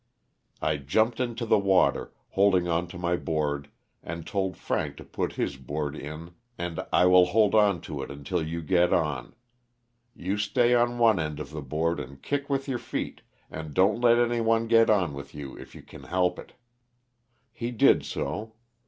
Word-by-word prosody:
I 75 -1 +1
jumped 110 - +1
into 120 -1 -2
the 110 - +4
water, 95 -2 +2 0.2
holding 95 -3 +3
on 85 +1 0
to 85 - -9
my 85 0 0
board 75 -4 -2 0.3
and 85 -1 -7
told 95 -2 -2
Frank - - -2
to - - -9
put - - -3
his 70 - -2
board 75 +3 -4
in 75 +3 -8 0.3
and 85 -2 -4
" - - -33
I - - +4
will 90 0 +6
hold 105 +2 +3
on 105 -6 +4
to 75 -3 -6
it - - -6
until 70 +5 -3
you 80 +1 -4
get 90 +1 +3
on; 75 -7 -1 0.8
you 95 0 -3
stay 120 +4 +2
on 120 0 +2
one 115 -5 +4
end 75 -2 -3
of 75 -1 -7
the 75 -1 -5
board 80 +5 -1
and 70 +2 -8
kick 140 - -3
with 135 0 -1
your 130 -3 -2
feet, - - -5 0.3
and 80 -2 -7
don't 100 +5 +3
let 120 -1 +5
anyone 115 -1 +2
get 115 0 +5
on 95 -8 +2
with 70 0 -9
you 70 -2 -7
if - - -12
you - - -11
can - - -13
help 90 -1 0
it." - - -12 1.0
He 115 +1 -4
did 120 -3 +4
so. 110 +1 -4
90 Hz, 190 wpm, -27 LUFS, 75-110 Hz, 1.0 s, will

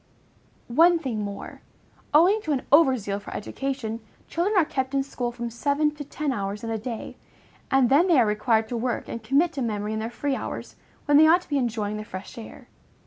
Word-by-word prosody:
One 335 +8 +5
thing 255 -9 -3
more. 200 -1 -7 0.5
Owing 360 +8 +5
to 310 -7 -1
an 265 - -2
over 280 -3 +6
zeal 200 -2 -3
for 205 - -10
education, 245 -1 -4 0.3
children 380 +5 0
are 345 - +5
kept 265 -1 -2
in 275 - +2
school 245 -3 -4
from 235 -1 -5
seven 285 +5 +1
to 295 -1 -7
ten 290 0 -3
hours 205 -2 -4
in 225 - -3
a 225 - -2
day, 230 0 -6 0.5
and 270 -2 +4
then 290 +9 +4
they 335 -7 +5
are 240 - +5
required 220 +1 +1
to 245 - -3
work 245 +1 -2
and 230 - -6
commit 280 +10 +2
to 275 - -4
memory 210 -2 -2
in 220 - -2
their 225 +1 -3
free 275 +3 -2
hours, - - -6 0.3
when 290 -1 +5
they 315 +1 +7
ought 345 +3 +5
to - - -20
be 285 -2 +1
enjoying 215 -4 -2
the 215 - -5
fresh 190 -2 -9
air. 225 - -11
255 Hz, 215 wpm, -25 LUFS, 220-295 Hz, 0.5 s, they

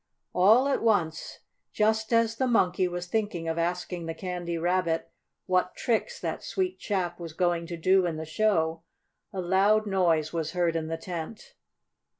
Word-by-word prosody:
All 220 +9 +5
at 280 - 0
once, 175 -8 0 0.3
just 220 +1 +1
as 230 -1 +3
the 260 - +1
Monkey 185 -6 +2
was 175 0 -4
thinking 185 -4 -2
of 165 +1 -1
asking 175 0 -2
the 165 - -4
Candy 175 -2 -4
Rabbit 175 -1 0 0.3
what 180 -1 +1
tricks 230 -2 -1
that - - -4
sweet 370 -1 -2
chap 180 -4 -2
was 165 -2 -7
going 175 -1 0
to 170 - -5
do 185 +2 +3
in 165 - -2
the 160 - -5
show, 165 -2 +1 0.5
a 195 - -5
loud 195 +4 +3
noise 170 -6 +1
was 160 -1 -2
heard 175 -2 +1
in 160 -1 -2
the 165 0 -3
tent. 170 +4 -7
180 Hz, 165 wpm, -27 LUFS, 165-210 Hz, 0.5 s, All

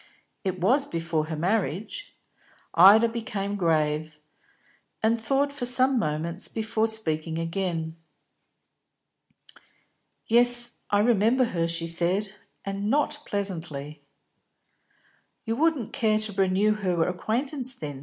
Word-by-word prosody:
"It 190 -2 -3
was, 255 +11 +2
before 165 -2 -2
her 160 - -4
marriage." 190 - -2 0.6
Ida 205 +7 +7
became 220 -4 -4
grave, 155 -3 0 0.9
and 225 +1 +2
thought 275 +4 0
for 250 -4 -3
some 255 +1 +4
moments 165 +2 -3
before 220 0 -1
speaking 160 -7 -1
again. 165 -1 -3 2.3
"Yes, 240 +1 +4
I 205 0 +3
remember 230 +3 +3
her," 165 -1 0
she 165 0 -2
said, 180 +5 -1 0.3
"and 200 +1 -3
not 295 +2 +1
pleasantly." 160 -7 -5 1.4
"You 225 -1 -1
wouldn't 300 -5 0
care 215 -2 +1
to 215 -1 -1
renew 195 +2 +2
her 180 -6 -1
acquaintance 255 - -2
then?" 145 -3 -7
200 Hz, 110 wpm, -26 LUFS, 165-230 Hz, 2.3 s, Ida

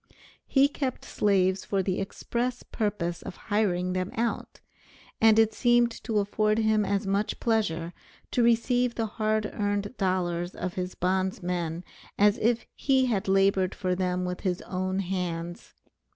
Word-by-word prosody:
He 275 0 +5
kept 270 -3 -4
slaves 190 -2 +1
for 195 -1 0
the 185 0 -1
express 240 +5 -3
purpose 195 -6 -2
of - - -8 0.2
hiring 185 -4 +1
them 185 0 -1
out, 230 +1 -2 0.6
and 220 -1 +6
it 220 -1 +4
seemed 240 0 +3
to 220 - 0
afford 210 +1 +1
him 220 -1 +3
as 200 0 -1
much 200 +2 -1
pleasure 175 -7 0 0.4
to 245 - +2
receive 235 +1 +2
the 225 - 0
hard 215 0 -1
earned 205 +2 -2
dollars 180 -2 -1
of 180 - -4
his 180 0 -4
bondmen 180 -2 -1 0.3
as 205 +1 +4
if 235 +1 +1
he 265 -2 +2
had 210 -6 -1
labored 195 -1 +3
for 185 -2 -1
them 180 0 -1
with 180 0 -3
his 180 -3 -2
own 185 +1 -2
hands. 175 -2 -4
195 Hz, 150 wpm, -27 LUFS, 185-220 Hz, 0.6 s, and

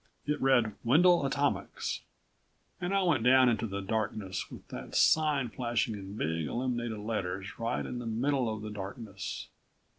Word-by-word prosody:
It 150 0 -1
read: 120 -5 +4
WENDEL 165 +4 +5
ATOMICS. 140 +1 -1 0.8
And 175 +1 -1
I 195 -1 +3
went 155 -10 +2
down 130 +1 +6
into 115 -1 0
the 100 -1 -4
darkness 100 -2 -2
with - - -11
that - - -7
sign 150 -5 +4
flashing 120 -1 -1
in 100 0 -7
big 80 -4 -1
illuminated 120 -2 -2
letters 100 -3 -4
right 115 0 -1
in 125 - -4
the 120 - -5
middle 125 +1 +1
of 110 -1 -5
the 110 - -5
darkness. 100 0 -6
115 Hz, 155 wpm, -31 LUFS, 105-130 Hz, 0.8 s, down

